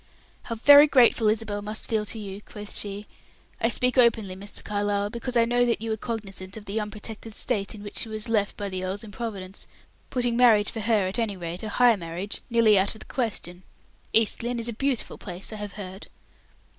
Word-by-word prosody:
"How 230 - -3
very 285 +6 +8
grateful 240 -5 +5
Isabel 210 -1 -1
must 215 +1 -4
feel 215 -2 0
to 225 - -1
you," 200 -1 -7
quoth 210 0 -9
she. 205 0 -3 0.6
"I 230 - +3
speak 250 +1 +1
openly, 225 -6 +3
Mr. 200 +2 -6
Carlyle, 205 0 -1
because 240 +1 -2
I 230 - +5
know 245 +1 +2
that 235 - +1
you 225 +1 -3
were - - +1
cognizant 200 -4 -6
of 210 - -10
the 210 +2 -2
unprotected 215 +1 -6
state 210 -3 -2
in 205 - -10
which 205 - -4
she 225 - 0
was 215 +2 -2
left 215 -3 0
by 205 - -3
the 185 -1 -4
earl's 190 +3 -3
improvidence, 205 -3 -7 0.4
putting 245 -2 0
marriage 225 -4 +5
for 225 - -5
her, 215 -2 +2
at 190 +5 -2
any 215 -4 -1
rate, 175 0 -5
a 215 - -4
high 240 +2 +5
marriage, 175 +2 -5
nearly 225 -4 +5
out 195 +3 +1
of - - -12
the - - -9
question. 185 -8 -3 0.5
East 225 +1 +2
Lynne 240 +1 -2
is 230 - -3
a 235 - -2
beautiful 270 +1 -2
place, 185 +2 -6
I - - -6
have 205 -1 -6
heard." 190 -1 -8
215 Hz, 210 wpm, -26 LUFS, 200-230 Hz, 0.6 s, very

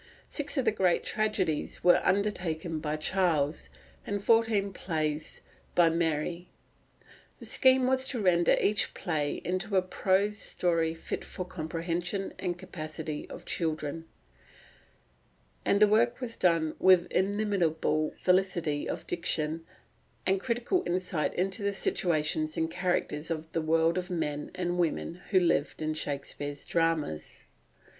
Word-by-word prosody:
Six 290 0 0
of 265 - +1
the - - +4
great 185 -4 +2
tragedies 205 -8 -1
were 175 - +6
undertaken 180 -5 0
by 150 -1 -2
Charles, 160 -3 +1 0.3
and 205 0 -2
fourteen 225 -3 +4
other - - -14
plays 155 -4 -3 0.3
by 170 -2 +5
Mary. 170 +1 -1 0.9
The - - -11
scheme 260 -1 +4
was 260 0 +2
to 255 - -3
render 175 -4 +4
each 205 -1 +1
play 150 -4 -2
into 190 +3 0
a 185 - +3
prose 200 +3 +1
story 165 -3 0
fit 165 - -5
for 185 - -5
the - - -18
comprehension 170 +3 -3
and 175 -2 -2
capacity 155 -3 -6
of - - -9
children; 160 -1 -2 1.6
and 200 - +2
the 210 - +7
work 230 +4 +3
was 245 -3 -4
done 165 -3 +2
with 185 -2 +6
inimitable 180 -6 +1
felicity 180 -5 +1
of - - -4
diction, 165 -2 -1 0.6
and 190 0 +2
critical 245 - 0
insight 175 -2 -1
into 190 +3 -1
the 200 0 0
situations 155 -4 0
and 160 0 0
characters 175 -4 -1
of 160 -1 -4
the 165 - -1
world 165 +2 +2
of 180 - -6
men 150 -4 -2
and 180 -1 -1
women 170 +1 -1
who 190 - +5
live 165 -4 +1
in 155 0 -2
Shakespeare's 145 -1 -4
dramas. 165 - -1
175 Hz, 135 wpm, -29 LUFS, 155-195 Hz, 1.6 s, the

